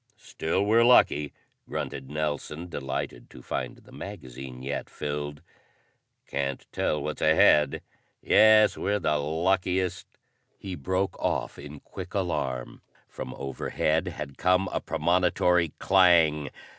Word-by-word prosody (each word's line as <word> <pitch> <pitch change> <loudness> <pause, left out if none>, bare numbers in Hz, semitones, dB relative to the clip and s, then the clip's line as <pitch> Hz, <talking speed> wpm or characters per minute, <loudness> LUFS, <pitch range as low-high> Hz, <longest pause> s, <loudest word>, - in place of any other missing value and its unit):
"Still 95 +5 -2
we're 115 +3 +5
lucky," 75 - +4 0.4
grunted 65 - -5
Nelson, 75 +2 -3
delighted 65 -5 -5
to - - -13
find - - -4
the - - -19
magazine 65 -9 -9
yet 70 +2 -4
filled. 75 0 -5 0.8
"Can't 70 -1 -3
tell 75 - -1
what's 75 0 -4
ahead. 80 -1 +4 0.4
Yes, 110 -1 +5
we're 105 +1 0
the 75 -6 +1
luckiest 90 +4 0 0.3
" - - -45
He 95 - -7
broke 95 +5 -2
off - - -2
in 75 0 -10
quick 95 0 -9
alarm. 65 -10 -2 0.3
From 65 - -7
overhead 75 +5 -1
had 75 -5 -7
come 90 +2 +3
a - - -1
premonitory 90 -1 +2
clang! 85 -6 +4
80 Hz, 120 wpm, -27 LUFS, 70-95 Hz, 0.8 s, we're